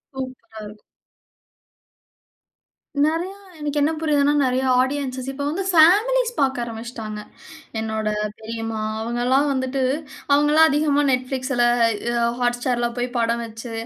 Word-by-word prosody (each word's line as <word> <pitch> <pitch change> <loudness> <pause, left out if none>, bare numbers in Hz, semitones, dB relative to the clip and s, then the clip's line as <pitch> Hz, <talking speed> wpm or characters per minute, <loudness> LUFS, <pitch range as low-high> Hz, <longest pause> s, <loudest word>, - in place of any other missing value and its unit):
சூப்பரா 255 -4 -8
இருக்கும். 210 0 -12 2.2
நிறைய 335 +4 -1 0.3
எனக்கு 295 0 -3
என்ன 305 +3 +3
புரிதுனா 290 -2 +2
நிறைய 255 0 +1 0.2
ஆடியன்ஸ் 260 -1 -2
இப்போ 285 +1 -5
வந்து 340 +6 -2
பேமிலீஸ் 455 +10 +5
பார்க்க 265 -3 +1
ஆரம்பிச்சிட்டாங்க, 225 -2 -6 0.6
என்னோட 220 -1 -3 0.3
பெரியம்மா 225 0 -5 0.2
அவங்க 235 +2 -3
எல்லாம் 270 +3 +3
வந்துட்டு 260 0 -1 0.5
அவங்கலாம் 300 +2 +5
அதிகமா 290 0 +2
Netflixல, 255 0 -1 0.6
அ - - +3
Hotstarல 245 0 0
போய் 245 +1 -1
படம் 235 0 0
வைச்சு, 225 +1 -8
260 Hz, 115 wpm, -22 LUFS, 235-290 Hz, 2.2 s, பேமிலீஸ்